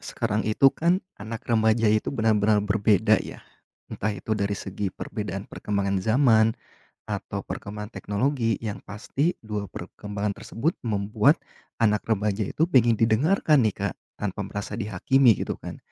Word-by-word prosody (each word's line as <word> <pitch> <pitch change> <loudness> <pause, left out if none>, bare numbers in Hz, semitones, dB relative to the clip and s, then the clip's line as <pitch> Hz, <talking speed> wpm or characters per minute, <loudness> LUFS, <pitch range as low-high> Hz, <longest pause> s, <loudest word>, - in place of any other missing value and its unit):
sekarang 105 +1 -2
itu 135 +5 +5
kan 175 +4 +1 0.2
anak 110 +2 -6
remaja 110 0 +2
itu 110 - +1
benar-benar 110 -4 +2
berbeda 105 +1 +3
ya. - - -9 0.5
Entah 105 - -2
itu 110 - -4
dari 100 -1 0
segi 95 +1 -4
perbedaan 100 0 -5
perkembangan 100 -3 -2
zaman, 110 0 +4 0.5
atau - - -4
perkembangan 105 +1 -6
teknologi 115 +1 -1
yang 105 -3 -5
pasti 130 +9 -1
2 105 -2 -4
perkembangan 105 0 -5
tersebut 150 +9 -2
membuat 110 +7 +2 0.4
anak 105 -2 +3
remaja 105 -1 0
itu 160 - 0
pengen 120 -8 +4
didengarkan 140 - +3
nih, 110 - +2 0.2
Kak, - - -7 0.3
tanpa - - -3
merasa 100 0 -5
dihakimi 115 +4 +3
gitu - - -2
kan. - - -8
110 Hz, 140 wpm, -25 LUFS, 105-115 Hz, 0.5 s, itu